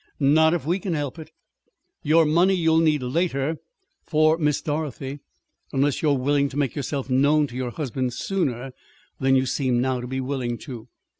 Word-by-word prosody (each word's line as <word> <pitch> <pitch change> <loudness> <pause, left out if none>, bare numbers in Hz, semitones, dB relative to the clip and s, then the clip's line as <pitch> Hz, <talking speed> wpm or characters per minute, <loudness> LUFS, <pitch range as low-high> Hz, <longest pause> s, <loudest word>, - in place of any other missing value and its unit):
"Not 160 +3 +4
if 160 - -4
we 175 +5 0
can 185 -4 -2
help 145 +1 -4
it. 155 0 -10 0.7
Your 160 +2 +4
money 175 +5 +3
you'll 160 -2 +3
need 155 -4 +2
later 150 +2 -1 0.4
for 155 0 +3
Miss 150 -3 +1
Dorothy 145 -2 -4 0.5
unless 140 0 +1
you 155 - +2
are 140 - +3
willing 140 +2 +1
to 135 - -8
make 140 -4 0
yourself 140 -2 -3
known 145 +3 +3
to 125 -4 -10
your 130 -1 -2
husband 130 -2 -3
sooner 135 -10 -2 0.5
than 135 0 +3
you 130 0 +3
seem 130 -1 0
now 130 0 0
to 125 - -6
be 130 +1 -3
willing 130 -3 -2
to. 120 -4 -9
145 Hz, 180 wpm, -24 LUFS, 130-155 Hz, 0.7 s, Not